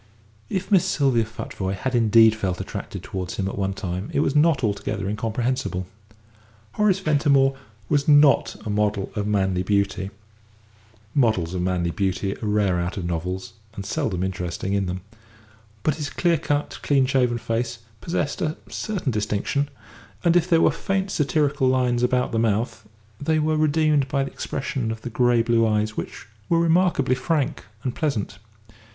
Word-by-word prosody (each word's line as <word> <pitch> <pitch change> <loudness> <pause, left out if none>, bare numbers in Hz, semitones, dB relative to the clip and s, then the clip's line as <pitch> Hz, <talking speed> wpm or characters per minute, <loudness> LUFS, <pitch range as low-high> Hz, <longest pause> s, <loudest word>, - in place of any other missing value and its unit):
If 190 +2 -3
Miss 190 -4 +6
Sylvia 135 -6 +2
Futvoye 100 -3 -4
had 130 +7 -3
indeed 115 -1 +6
felt 95 -5 -2
attracted - - -6
towards 95 -2 -5
him 95 - -2
at 95 - -4
one 95 -1 -1
time 90 +1 -4
it - - +1
was 140 - 0
not 150 -3 +4
altogether 105 -1 -1
incomprehensible. 110 -2 -2 0.9
Horace 210 -3 +2
Ventimore 140 -5 +3 0.3
was 145 +2 +1
not 145 -1 +5
a 105 - -2
model 105 -1 0
of 105 -1 -1
manly 95 -3 +1
beauty 100 0 0 1.0
models 110 - +2
of 90 - -2
manly 90 -1 0
beauty 95 +1 -1
are 110 - -4
rare 100 -4 +2
out 85 +3 -3
of 90 - -3
novels, 90 +3 -3 0.2
and 100 - -6
seldom 95 -2 -1
interesting 95 0 -3
in 100 -2 0
them; 90 +1 -4 0.8
but 155 -1 +1
his 150 -2 -3
clear 170 0 +1
cut, 145 0 -2
clean 140 -2 +3
shaven 125 -3 +2
face 115 +1 -2 0.2
possessed 150 -4 -2
a 155 0 -1
certain 190 -10 -2
distinction, 105 +6 -1 0.5
and 170 0 +3
if 175 0 +3
there 165 -2 +5
were - - +5
faint 195 +4 -2
satirical 145 -2 +1
lines 125 -2 +2
about 125 0 +1
the 115 - 0
mouth, 110 0 -1 0.3
they 155 +2 +1
were 155 0 +1
redeemed 155 -2 +2
by 140 0 0
the 135 - -5
expression 130 -3 -3
of 110 0 -4
the 120 - -5
grey 120 -1 +3
blue 115 -1 +3
eyes, 110 0 0
which - - -6 0.2
were 170 - +3
remarkably 165 -5 +3
frank 150 +1 -1 0.2
and 125 - -2
pleasant. 130 - -2
120 Hz, 165 wpm, -23 LUFS, 100-145 Hz, 1.0 s, Miss